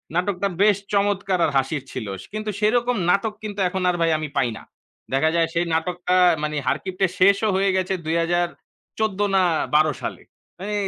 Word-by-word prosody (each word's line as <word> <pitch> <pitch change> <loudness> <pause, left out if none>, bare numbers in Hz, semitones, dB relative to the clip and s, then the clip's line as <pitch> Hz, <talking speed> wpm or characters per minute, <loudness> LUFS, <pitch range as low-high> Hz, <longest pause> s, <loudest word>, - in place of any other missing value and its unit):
নাটকটা 180 +2 0
বেশ 205 -1 +5 0.2
চমৎকার 200 -2 +1
আর - - -1
হাসির 135 +1 -1
ছিল। 110 - -5
সে - - -14
কিন্তু 215 0 -4
সেরকম 240 +3 +2
নাটক 205 +4 +2
কিন্তু 205 -1 -6
এখন 190 +1 -3
আর 180 - +1
ভাই 165 0 +3
আমি 155 -1 -4
পাই 125 - +2
না। - - -12 0.5
দেখা 140 +4 +3
যায় 165 -1 +3
সেই 170 0 +1
নাটকটা 180 +2 -1 0.3
মানে 150 0 -2
'হারকিপ্টে' 190 0 0
শেষও 200 +3 +4
হয়ে 195 +1 +2
গেছে 185 0 -1
২০১৪ 175 +5 -2 0.2
না 190 - +5 0.3
১২ 155 0 +4
সালে। - - -5 0.4
মানে 205 +3 -4
185 Hz, 170 wpm, -22 LUFS, 165-200 Hz, 0.5 s, বেশ